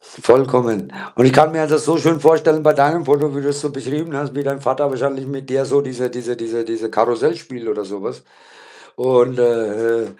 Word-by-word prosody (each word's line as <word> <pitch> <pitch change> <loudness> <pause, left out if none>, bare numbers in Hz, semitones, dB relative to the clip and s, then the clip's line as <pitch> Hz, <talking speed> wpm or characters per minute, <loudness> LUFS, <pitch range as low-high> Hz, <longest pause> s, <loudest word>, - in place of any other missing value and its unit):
Vollkommen. 125 -5 +1 0.2
Und 120 - +5
ich 130 - +5
kann 155 +3 +6
mir 160 - -1
halt 155 -1 -1
das 155 - +2
so 160 +2 +2
schön 160 0 +2
vorstellen 160 -1 +4
bei 155 - +5
deinem 150 +4 +2
Foto, 145 0 +1
wie 140 - -4
du's 145 0 -2
so 150 -1 -4
beschrieben 145 +3 -6
hast, 140 -2 -5
wie 145 - -3
dein 140 0 -3
Vater 140 +2 0
wahrscheinlich 135 0 -3
mit 135 -1 -8
dir 135 +1 0
so 140 - +2
diese 125 -2 -4
diese 125 0 -6
diese 115 0 -5
diese 115 0 -5
Karussell 120 +8 +1
spielt 125 -8 -12
oder 105 -1 -3
so 100 0 -9
was - - -7 0.7
und, 125 0 +2
äh, 115 -1 0
135 Hz, 210 wpm, -18 LUFS, 120-145 Hz, 0.7 s, kann